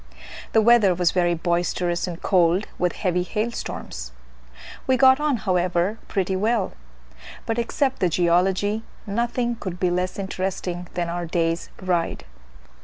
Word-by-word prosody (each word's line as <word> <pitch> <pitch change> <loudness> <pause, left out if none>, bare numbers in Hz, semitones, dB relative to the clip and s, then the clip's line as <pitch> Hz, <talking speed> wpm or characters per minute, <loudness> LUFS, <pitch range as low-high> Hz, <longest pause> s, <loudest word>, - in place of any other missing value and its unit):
The 220 - +5
weather 220 -5 +5
was 175 -1 +2
very 175 -1 +2
boisterous 175 +1 0
and 175 -1 -5
cold 180 +1 +3
with 180 -1 +1
heavy 180 -2 0
hail 215 +5 -2
storms. - - -6 0.8
We 260 -1 +3
got 260 +2 +6
on, 300 -4 +1
however, 185 +1 0
pretty 190 -2 -1
well 215 +2 0 0.7
but, 225 +1 -1
except 265 +3 0
the 180 - +2
geology, 185 +5 +2 0.2
nothing 235 +3 -1
could 180 -4 -6
be 180 -1 +1
less 180 +1 -1
interesting 185 -2 -3
than 175 -1 -1
our 170 0 -3
day's 165 0 -1
ride. 175 -3 -1
185 Hz, 140 wpm, -23 LUFS, 175-220 Hz, 0.8 s, got